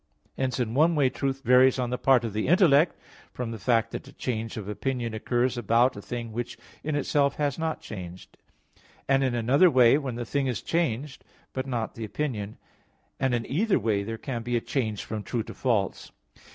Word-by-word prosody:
Hence 130 -1 -1
in 115 -2 -1
one 160 +5 +4
way 135 -4 +3
truth 135 -1 -3
varies 130 +1 +5
on 125 -1 -1
the 125 - -1
part 130 -3 +4
of 110 - -4
the 110 +3 -1
intellect, 165 -2 +5 0.4
from 125 -2 -4
the 115 - -6
fact 115 +2 +1
that - - -6
a - - -12
change 115 -3 -4
of 105 -3 -6
opinion 120 +1 -3
occurs 120 +3 0
about 120 +3 +3
a 100 - -7
thing 120 +1 -5
which 120 +1 -4 0.3
in 155 0 -2
itself 140 0 +1
has 145 -1 -1
not 160 -1 -2
changed, 90 -3 -9 0.7
and 135 0 +3
in 130 -2 0
another 130 +10 +4
way, 130 0 +5
when 135 -5 -4
the 120 0 -4
thing 140 +2 -1
is 120 -6 -2
changed, 150 -5 -1 0.3
but 130 0 -3
not 120 -4 -2
the 115 - -7
opinion; 110 -2 -3 0.6
and 130 -2 +1
in 115 -1 -2
either 195 - +1
way 110 -4 0
there 115 +3 -5
can 120 -1 -4
be 120 +1 -1
a - - +1
change 110 -4 -2
from 110 -1 -4
true 115 +2 -3
to - - -9
false. 110 -7 -1
125 Hz, 205 wpm, -27 LUFS, 115-135 Hz, 0.7 s, varies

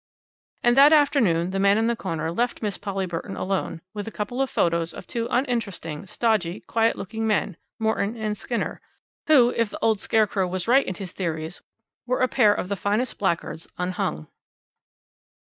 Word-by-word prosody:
And 240 0 +4
that 285 +3 +8
afternoon 225 - +3
the 195 - -1
man 200 +1 +4
in 225 - +2
the 235 0 +1
corner 165 -6 -3
left 235 +5 -1
Miss 205 -3 -1
Polly 195 -2 -2
Burton 175 +3 -5
alone 185 -3 -2
with 205 -1 -5
a - - -5
couple 230 +6 -3
of 270 - 0
photos 170 -1 0
of - - -9
two 230 -1 -3
uninteresting, 205 - -2
stodgy, 210 -4 0
quiet 225 0 +1
looking 220 +3 -4
men 210 -3 0 0.2
Morton 220 0 0
and 215 -1 -2
Skinner 235 +3 -3 0.5
who, 255 -6 +6
if 230 -2 +1
the - - -7
old 220 -2 +3
scarecrow 210 -4 +1
was 180 +1 -3
right 265 +3 +4
in 185 - -3
his 185 0 -7
theories, 160 -2 -4 0.5
were 255 +1 0
a 255 - +4
pair 225 -5 +4
of 195 - -1
the 200 - -1
finest 210 +6 -1
blackguards 170 -3 -1
unhung. 180 - -2
205 Hz, 180 wpm, -24 LUFS, 180-230 Hz, 0.5 s, that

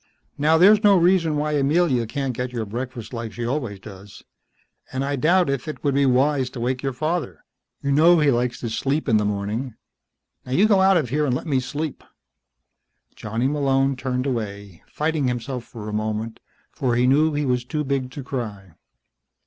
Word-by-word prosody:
"Now, 155 +3 +3
there's 205 +5 +6
no 200 -2 +6
reason 170 -3 +3
why 150 +1 -1
Amelia 145 -4 +2
can't 135 +2 -3
get 125 +1 -3
your 115 -3 -3
breakfast 120 +2 -6
like 115 -3 -5
she 120 +2 -4
always 120 -6 -3
does. 95 -1 -12 0.7
And 130 +1 -2
I 140 +1 -1
doubt 175 +6 +3
if 140 -1 -2
it 155 - -6
would 140 -2 +1
be 140 0 +3
wise 130 +1 +2
to 125 - -9
wake 125 +2 -1
your 135 - -1
father. 155 - -3 0.4
You 140 - 0
know 165 +5 +6
he 150 -3 +3
likes 120 0 -1
to 115 - -4
sleep 140 +7 -1
in 110 -4 +4
the 105 - 0
morning. 105 +5 -3 0.7
Now, 125 - -6
you 200 +9 +4
go 205 -3 +4
on 190 - +4
out 195 -1 +5
of 145 -8 -1
here 150 +3 0
and 125 - +1
let - - -4
me 140 -5 +1
sleep." 145 +4 -5 1.1
Johnny 115 +4 -2
Malone 135 -1 +1
turned 125 0 -2
away, 100 -7 -4
fighting 150 -2 -1
himself 125 0 -3
for 110 -3 -9
a 105 - -5
moment, 110 +1 -3 0.3
for 125 -3 -1
he 120 +1 +2
knew 150 +4 +3
he 145 0 0
was 125 -2 0
too 150 +4 -3
big 135 -2 -2
to 135 +2 -8
cry. 105 -8 -6
130 Hz, 195 wpm, -23 LUFS, 120-150 Hz, 1.1 s, there's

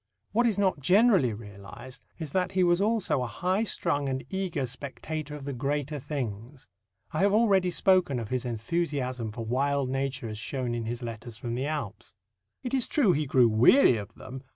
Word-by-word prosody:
What 235 +4 +3
is 215 -4 0
not 190 -6 +1
generally 185 - +4
realized 105 +4 -10
is 160 -4 -6
that 185 +1 0
he 185 -1 +3
was 175 +1 +3
also 205 - +1
a 125 - -2
high 185 - 0
strung 145 -9 -1
and 130 0 -3
eager 185 -8 -2
spectator 145 +4 -6
of 145 -2 -8
the 140 - -3
greater 145 +3 -2
things. 125 -2 -6 0.4
I 155 - -2
have 200 +2 +3
already 200 -5 +4
spoken 185 -6 +3
of 110 -3 -6
his 130 -1 -1
enthusiasm 125 -1 -2
for 115 +1 -6
wild 135 +2 0
nature 135 -1 -2
as 105 -1 -6
shown 125 +1 -3
in 115 -1 -3
his 120 +2 -4
letters 115 0 -7
from 120 0 -4
the 130 +4 -2
Alps. 115 -10 -5 0.5
It 250 - -4
is 260 -3 +1
true 255 -11 +3
he 150 -3 0
grew 130 -3 +5
weary 120 - +5
of 100 -2 -8
them. 130 0 -9
140 Hz, 190 wpm, -28 LUFS, 120-180 Hz, 0.5 s, grew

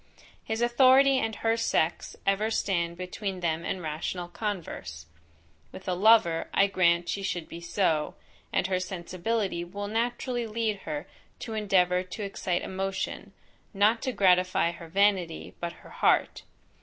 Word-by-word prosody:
his 220 +1 -2
authority 260 +2 +5
and 220 -3 -2
her 225 +1 +1
sex, 175 -7 0
ever 195 +3 +2
stand 170 -6 -1
between 185 +1 -4
them 165 -1 -1
and 180 0 -3
rational 160 +3 -3
converse. 175 - -5 0.7
With 190 - -11
a 185 - +1
lover, 185 -4 +4
I 195 - +6
grant 175 -3 +2
she 200 - -2
should 175 -4 -3
be 170 - -9
so, 170 -3 0 0.4
and - - +1
her 185 -1 0
sensibility 185 +1 -2
will 200 +4 -6
naturally 240 +2 -1
lead 220 -1 -1
her 150 +1 -3 0.4
to 225 - -5
endeavour 185 -4 +2
to 185 +3 -7
excite 190 -2 -2
emotion, 190 0 -4 0.4
not 215 +4 +3
to 260 - -1
gratify 180 -4 +3
her 170 -1 -10
vanity 190 -2 +1
but 170 0 -2
her - - -13
heart. - - +1
190 Hz, 145 wpm, -28 LUFS, 175-215 Hz, 0.7 s, I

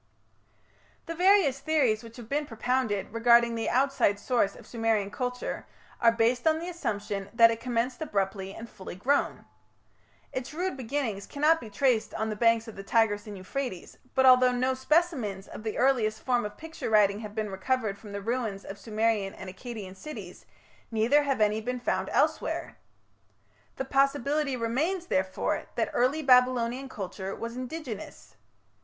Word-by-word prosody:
The 330 - -4
various 355 -6 +4
theories 270 -9 +2
which 230 +1 -12
have 235 -3 -9
been 290 +3 -1
propounded 225 -4 -1
regarding 235 0 +5
the 225 -1 -1
outside 260 -6 +2
source 230 -4 +1
of - - -13
Sumerian 225 -4 0
culture 250 -1 -4 0.3
are 230 -1 +6
based 235 +3 +1
on 315 0 +4
the 335 +2 -5
assumption 205 - -3
that 230 -1 +7
it 225 - -3
commenced 245 +3 -2
abruptly 195 -7 -2
and 225 +4 -8
full 190 -5 -9
grown. 275 +10 0 0.9
Its 260 +3 -5
rude 365 0 -1
beginnings 240 -5 -3
cannot 310 +3 +2
be 225 - -8
traced 235 +1 +1
on 220 0 -1
the - - -3
banks 230 +1 +3
of 225 - -9
the 195 - -7
Tigris 205 0 +1
and 205 -1 -7
Euphrates, 190 0 -5 0.2
but 265 -1 +4
although 255 -1 +7
no 255 +1 +1
specimens 260 - 0
of - - -9
the 215 -1 -4
earliest 230 -5 +2
form 245 -3 +1
of 210 0 -7
picture 320 -5 -6
writing 205 -2 +4
have 210 -1 -8
been 215 -2 -2
recovered 215 +1 -1
from 210 - -11
the 200 0 -5
ruins 225 -4 -2
of 195 - -8
Sumerian 215 -3 0
and 190 -1 -8
Akkadian 205 -3 -8
cities, 305 +10 -9 0.4
neither 230 +6 +3
have 280 -3 -1
any 215 +1 +2
been 250 +3 -3
found - - -1
elsewhere. - - 0 1.0
The 265 - -3
possibility 275 +1 +1
remains, 300 +11 -1
therefore, 190 - -1
that - - 0
early 265 +6 +1
Babylonian 250 0 +3
culture 195 -2 -5
was 230 +1 -6
indigenous. 255 -4 -7
235 Hz, 160 wpm, -28 LUFS, 210-265 Hz, 1.0 s, that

